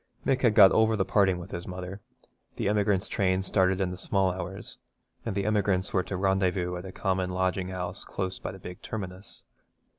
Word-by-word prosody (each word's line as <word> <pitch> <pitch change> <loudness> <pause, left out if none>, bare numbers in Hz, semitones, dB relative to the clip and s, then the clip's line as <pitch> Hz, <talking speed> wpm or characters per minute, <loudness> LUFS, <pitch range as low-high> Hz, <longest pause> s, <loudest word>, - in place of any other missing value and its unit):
Mick 130 -1 +2
had 115 -4 +3
got 95 - +9
over 110 0 +4
the 95 -3 +1
parting 95 -3 +3
with 90 +1 -9
his 85 0 -5
mother. 90 +2 -6 0.5
The - - -1
emigrants' 100 -2 +1
train 95 -2 +1
started 95 -1 +2
in 95 -2 0
the 90 - -6
small 95 -1 +1
hours, 90 +1 -7 0.5
and - - -2
the 100 -1 -1
emigrants 100 -3 +1
were 95 - +3
to 95 +1 -4
rendezvous 95 -2 +1
at 90 +2 -6
a 95 - -7
common 95 -1 -1
lodging 95 0 0
house 90 -1 -5
close 95 -1 -4
by - - -5
the 95 - -10
big 90 -1 -9
terminus. 95 -3 -7
95 Hz, 200 wpm, -28 LUFS, 90-100 Hz, 0.5 s, got